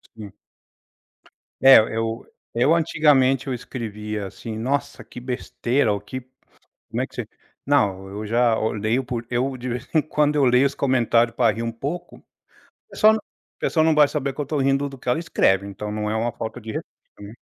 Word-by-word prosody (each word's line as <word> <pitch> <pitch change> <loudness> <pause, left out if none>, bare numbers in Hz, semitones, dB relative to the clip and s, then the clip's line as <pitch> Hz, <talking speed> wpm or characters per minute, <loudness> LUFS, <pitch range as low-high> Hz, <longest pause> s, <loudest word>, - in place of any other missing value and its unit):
Sim. 105 -3 -10 1.3
É, 135 0 +9 0.2
eu 115 +1 -3 0.3
eu 125 +7 +3
antigamente 145 -5 +3
eu 130 - -1
escrevia 105 -4 -5
assim: 110 +3 -7
"Nossa, 140 +5 -2
que - - -11
besteira" 125 -1 -1
ou 100 - -2
que 130 +5 -6 0.7
como - - -1
é - - -2
que - - -24
você - - -4 0.4
não, 100 -9 +1
eu 105 +2 -6
já 115 +1 +3
eu 110 0 -1
leio 110 +5 0
por 120 -2 -4
eu 130 +2 -1
de 125 +1 -5
vez 120 0 -5
em 155 - +5
quando 150 0 0
eu 145 - +4
leio 125 +2 +4
os 140 - -2
comentário 120 -3 +2
para 120 - +3
rir 115 - -4
um 115 0 -3
pouco, 145 +10 -6 0.7
pessoal 215 +1 +5
não 220 - -2 0.4
pessoal 160 -2 +1
não 160 - +4
vai 150 -1 +6
saber 140 -3 -2
que - - -6
eu 145 - -2
tõ 150 +2 -2
rindo 135 +1 +1
do 135 -1 -11
que - - -9
ela 125 - +2
escreve, 100 - +1
então 100 +1 -6
não 105 0 -2
é 110 - -1
uma 115 +1 -1
falta 115 +2 -6
de 110 -1 -7
respeito, - - -6 0.3
né. 100 +1 -9
125 Hz, 200 wpm, -23 LUFS, 110-140 Hz, 1.3 s, É